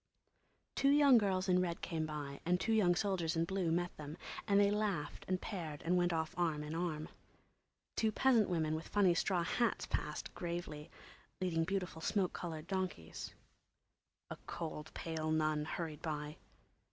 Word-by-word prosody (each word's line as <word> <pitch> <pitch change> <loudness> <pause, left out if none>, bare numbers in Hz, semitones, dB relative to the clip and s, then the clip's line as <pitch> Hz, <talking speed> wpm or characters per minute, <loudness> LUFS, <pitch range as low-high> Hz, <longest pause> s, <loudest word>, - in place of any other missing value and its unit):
Two 275 - +3
young 280 -4 +7
girls 190 -2 +1
in 180 -1 +4
red 170 -2 -2
came 160 -3 -1
by 145 -2 -5
and 180 +1 +2
two 225 - +1
young 185 -5 +4
soldiers 185 -5 0
in 165 0 +2
blue 185 -2 0
met 175 +1 0
them, 150 +1 -7 0.3
and 200 -1 +5
they 200 0 +5
laughed 205 -7 -1
and 185 0 +1
paired 165 -9 -5
and 175 +2 +3
went 175 0 +3
off 160 0 -1
arm 160 -4 +1
in 150 +1 -5
arm. 160 -2 -2 0.9
Two 220 -1 +2
peasant 235 -2 +4
women 160 -3 +1
with 160 +1 -3
funny 195 -4 +4
straw 175 0 +1
hats 235 +7 +1
passed, - - -3
gravely, 170 -3 -4 0.5
leading 165 -3 +1
beautiful 180 -3 -2
smoke 190 +2 +1
coloured 160 -3 -5
donkeys. 185 - -4 1.0
A - - -4
cold, 155 -2 -5
pale 160 -1 -2
nun 155 -1 +1
hurried 155 -2 -4
by. 150 -2 -4
170 Hz, 165 wpm, -36 LUFS, 155-190 Hz, 1.0 s, young